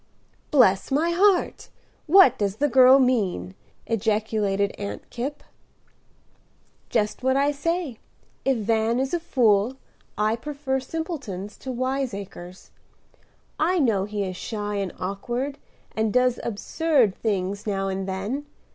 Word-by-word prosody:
"Bless 225 -10 +4
my 305 +5 +1
heart! 375 +1 +2 0.4
what 345 - +7
does 200 -2 0
the 285 +6 +1
girl 260 0 +7
mean?" 205 - +1 0.3
ejaculated 210 -2 0
Aunt 200 0 -6
Kipp. 270 +5 -5 1.5
"Just 210 -3 0
what 260 +1 +2
I 285 +1 +3
say. 300 -3 -2 0.4
If 270 -2 +2
Van 225 +2 +1
is 265 +3 -2
a 345 - +1
fool, 240 -7 +2 0.4
I 215 +2 +2
prefer 275 +1 -3
simpletons 260 - -5
to 260 - -5
wiseacres. 235 -8 -4 0.9
I 355 +4 +2
know 225 - +2
he 205 -1 -3
is 185 -1 -4
shy 205 +1 -4
and 195 -3 -2
awkward, 240 +9 -3 0.4
and 220 -1 0
does 250 0 +2
absurd 245 - +1
things 200 -1 -2
now 195 -1 -1
and 190 0 -3
then. 205 +10 -3
230 Hz, 125 wpm, -24 LUFS, 200-275 Hz, 1.5 s, what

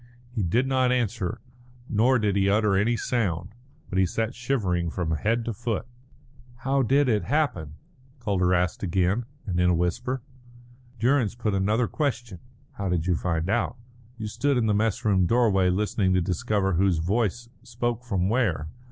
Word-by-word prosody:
He 120 -3 -2
did 110 +9 +1
not 130 -1 +2
answer, 115 -3 -1 0.5
nor 120 +4 +3
did 105 -3 0
he 100 0 +2
utter 105 -1 +3
any 115 +5 +2
sound, 95 -8 -1 0.4
but 95 - -1
he 95 - +4
sat 115 +6 -2
shivering 100 -10 -1
from 85 -1 -3
head 110 +9 0
to 115 - -2
foot. 115 0 -3 0.8
"How 135 0 +2
did 135 +3 +3
it 110 -4 +1
happen?" 125 - -1 0.4
Calder 95 -6 +1
asked 90 0 +1
again, 95 +5 +1 0.2
and 90 -4 -1
in 90 0 +4
a 90 - +3
whisper. 90 +9 -1 0.7
Durrance 120 -1 +2
put 110 -4 -1
another 105 +5 +1
question: 120 - -3 0.3
"How 100 -2 -4
did 85 -2 0
you 90 - +2
find 85 0 -1
out?" 120 +3 0 0.4
"You 110 - -5
stood 140 +6 0
in 120 - +2
the 105 - +2
mess 110 +3 0
room 95 -4 +3
doorway 105 -5 +3
listening 95 0 +1
to 90 - +3
discover 95 +3 0
whose 90 0 +2
voice 110 +7 -1
spoke 120 0 -3
from 95 -6 0
where. 100 - 0
105 Hz, 170 wpm, -26 LUFS, 90-120 Hz, 0.8 s, he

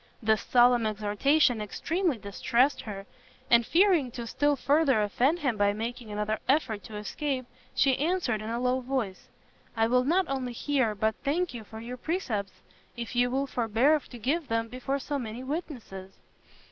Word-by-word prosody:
This 220 -2 +2
solemn 245 -2 +4
exhortation 215 +5 +2
extremely 320 - -1
distressed 235 +6 +1
her; 195 -1 -6 0.5
and 235 0 +7
fearing 340 - +3
to 240 -2 -5
still 290 +5 +1
further 280 -2 +3
offend 255 +10 +2
him 270 -9 -1
by 205 0 +3
making 230 +2 -5
another 210 +1 -2
effort 255 -8 +1
to 215 - -9
escape, 255 +5 -3 0.3
she 265 -2 +3
answered 300 - 0
in 215 - -5
a 235 +1 -2
low 250 +1 +1
voice, 250 -7 -3 0.5
"I 225 - +4
will 250 +2 +3
not 355 +8 +2
only 260 -3 -3
hear, 255 -4 0
but 220 +2 +1
thank 330 +4 0
you 235 -2 -7
for 220 +1 -10
your 240 +2 -7
precepts, 230 - -3 0.3
if 235 0 -5
you 245 0 +3
will 270 +2 0
forbear 250 +4 +2
to 250 -3 -12
give 285 +7 -1
them 225 0 -1
before 255 +3 -2
so 285 +1 -3
many 235 0 -6
witnesses." 250 - -6
245 Hz, 170 wpm, -28 LUFS, 220-280 Hz, 0.5 s, and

